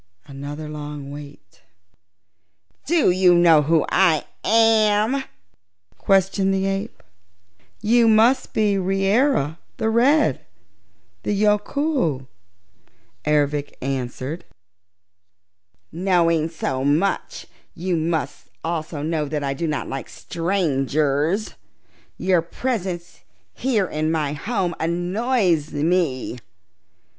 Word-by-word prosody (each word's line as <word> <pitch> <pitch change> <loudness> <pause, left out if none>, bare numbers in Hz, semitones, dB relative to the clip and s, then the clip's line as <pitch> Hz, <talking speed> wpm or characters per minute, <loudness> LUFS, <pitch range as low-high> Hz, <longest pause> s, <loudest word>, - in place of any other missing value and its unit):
Another 145 +2 -7
long 150 -2 -7
wait. 145 -9 -12 1.3
"Do 320 - +3
you 180 -1 +4
know 170 -3 +6
who 155 +1 +2
I 175 -5 +3 0.2
am?" 225 +3 +3 0.8
questioned 195 0 +2
the 195 0 0
ape. 195 +3 -3 0.8
"You 230 +2 +4
must 225 +4 +4
be 205 -2 +1
Reera 195 - +1 0.2
the 220 - 0
Red 245 - +3 0.8
the - - -1
Yookoohoo," 210 - 0 1.0
Ervic 145 -1 +1
answered. 130 +4 -4 1.5
"Knowing 170 -3 +1
so 135 -5 -3
much, 155 +8 0 0.3
you 180 +1 -2
must 160 0 -2
also 160 -2 -3
know 155 -1 -1
that 150 0 -3
I 135 -1 -1
do 165 +4 -3
not 150 -2 -2
like 135 -1 -6
strangers. 155 0 -1 0.6
Your 185 -2 +2
presence 180 -2 -4 0.3
here 235 -7 0
in 155 -2 -2
my 150 -3 -1
home 185 +2 -2
annoys 175 - 0
me. 150 -5 0
170 Hz, 95 wpm, -22 LUFS, 150-205 Hz, 1.5 s, know